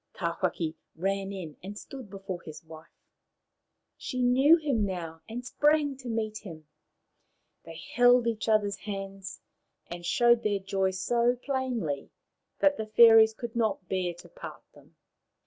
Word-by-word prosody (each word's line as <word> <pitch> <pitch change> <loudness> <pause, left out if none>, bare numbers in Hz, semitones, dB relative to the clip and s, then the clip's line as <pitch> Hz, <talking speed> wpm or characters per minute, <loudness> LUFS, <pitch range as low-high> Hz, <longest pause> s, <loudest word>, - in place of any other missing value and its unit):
Tawhaki 170 -2 -2 0.2
ran 195 +3 -2
in 175 -7 -7
and 200 +3 -8
stood 260 -1 -10
before 195 -2 -6
his 155 -2 -10
wife. 160 0 -13 1.1
She 255 -2 -3
knew 265 +6 +6
him 280 -9 0
now, 170 -4 -4
and 245 +2 -6
sprang 295 +1 +2
to 255 -2 -8
meet 220 -1 -2
him. 160 -6 -11 1.0
They - - -9
held 245 0 +5
each 225 -1 -1
other's 205 -2 +2
hands, 195 -1 -7 0.4
and 175 0 -8
showed 235 +6 +3
their 210 -3 0
joy 195 0 -1
so 235 +6 +1
plainly 245 - -2 0.5
that 290 0 +4
the 220 - -4
fairies 220 0 +7
could 235 0 -7
not 220 -5 -1
bear 180 -2 -1
to 175 - -14
part - - -10
them. - - -20
210 Hz, 145 wpm, -28 LUFS, 185-240 Hz, 1.1 s, fairies